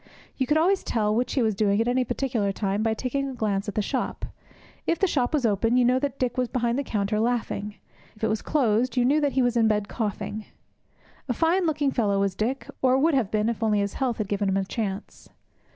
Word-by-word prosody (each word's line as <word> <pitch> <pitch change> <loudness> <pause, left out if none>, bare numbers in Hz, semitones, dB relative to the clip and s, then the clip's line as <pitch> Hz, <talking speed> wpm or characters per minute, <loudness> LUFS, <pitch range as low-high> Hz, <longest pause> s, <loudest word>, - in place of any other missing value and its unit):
You 260 - -1
could 300 - +3
always 370 +5 +2
tell 210 -2 0
which 245 +3 0
he 260 - +2
was 220 -1 +2
doing 200 0 +1
at 230 - +1
any 250 +1 +2
particular 235 -5 -1
time 195 +1 -1
by 220 0 +1
taking 275 +4 -2
a - - -6
glance 210 -2 -1
at 200 - -7
the 215 - +1
shop. 260 +4 -3 0.6
If 335 - +2
the 390 - +2
shop 260 -9 0
was 290 -5 +1
open, 225 +3 +2
you 250 - +4
knew 250 +1 +3
that 275 -1 -3
Dick 250 -1 -1
was 250 - +1
behind 240 +1 0
the - - -1
counter 210 -3 -1
laughing. 220 -3 -1 0.4
If 215 - -16
it - - +3
was 215 -1 -1
closed, 250 -3 +1
you 245 - +4
knew 295 +4 +3
that 285 -2 +1
he 260 - +2
was 245 -1 +1
in 230 -2 +4
bed 210 -1 +1
coughing. 215 -1 -4 0.8
A - - +2
fine 340 +5 +2
looking 290 -3 +1
fellow 205 -6 +1
was 195 -1 +1
Dick, 245 +9 -2
or 260 0 +4
would 315 +4 +3
have 255 -8 +1
been 215 0 0
if 235 0 -2
only 215 -2 +2
his 200 -1 -1
health 255 -4 -1
had 215 - -2
given 200 0 0
him 190 - +1
a 195 - 0
chance. 200 0 -5
235 Hz, 245 wpm, -25 LUFS, 210-260 Hz, 0.8 s, you